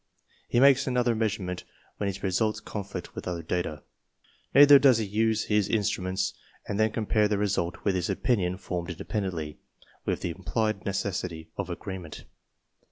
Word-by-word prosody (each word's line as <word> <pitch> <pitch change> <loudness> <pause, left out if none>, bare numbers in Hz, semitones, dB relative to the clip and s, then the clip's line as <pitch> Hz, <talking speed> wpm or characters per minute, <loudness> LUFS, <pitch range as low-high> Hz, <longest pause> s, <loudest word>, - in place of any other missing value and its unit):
He 120 - +3
makes 140 +1 +6
another 125 -2 +2
measurement 105 -5 -2 0.3
when 100 - -1
his 100 0 -4
results 105 +3 +1
conflict 100 -3 -6
with - - -7
other 85 -2 -3
data. 80 -2 -2 0.7
Neither 145 +1 +9
does 135 -4 +6
he 110 - -1
use 110 +2 +1
his 105 -2 +2
instruments 95 -3 0 0.3
and 100 - -2
then 110 0 +4
compare 105 -1 +2
their 105 -1 0
result 100 -4 -1
with 100 - +3
his 90 0 -1
opinion 95 -3 0
formed 90 -2 -4
independently, 85 -4 -4 0.4
with - - -1
the 85 - -2
implied 100 +3 -2
necessity 90 -4 -3
of 100 -2 -4
agreement. 90 -2 -6
100 Hz, 155 wpm, -27 LUFS, 90-110 Hz, 0.7 s, Neither